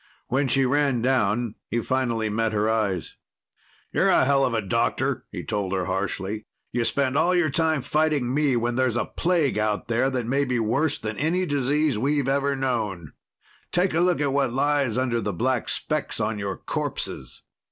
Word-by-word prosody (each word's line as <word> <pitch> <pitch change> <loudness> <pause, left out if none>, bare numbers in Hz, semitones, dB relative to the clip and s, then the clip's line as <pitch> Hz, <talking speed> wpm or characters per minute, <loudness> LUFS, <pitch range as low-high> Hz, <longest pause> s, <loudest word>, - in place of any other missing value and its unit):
When 135 +2 +1
she 135 +1 +3
ran 135 -3 +1
down, 120 -3 +1 0.2
he 120 - 0
finally 120 -3 0
met 110 +1 0
her 105 0 +1
eyes. 105 -6 -1 0.8
"You're - - +3
a - - +4
helluva 130 -6 +2
doctor," - - 0
he - - -6
told 100 -2 -2
her 95 -2 0
harshly. 100 +2 -3 0.2
"You 120 -1 0
spend 140 0 0
all 180 +1 +3
your 170 -4 +2
time 160 -2 +1
fighting 150 -5 +1
me 145 -2 +2
when 120 +1 0
there's 130 -3 +1
a 120 - 0
plague 165 - 0
out 105 +1 -1
there 120 +3 +2
that 125 -3 -2
may 135 +4 +1
be 125 -3 -1
worse 135 +7 +1
than 105 -1 -5
any 170 +6 +1
disease 145 -3 +1
we've 140 +2 +1
ever 140 +1 +1
known. 110 - -2 0.6
Take 180 0 +2
a 160 - +2
look 175 -2 +2
at 145 -2 0
what 140 -3 +1
lies 140 -2 +1
under 125 -3 0
the 105 -1 -2
black 125 +6 0
specks - - -2
on 105 -2 -1
your 100 -1 -3
corpses. - - -4
130 Hz, 180 wpm, -24 LUFS, 110-140 Hz, 0.8 s, a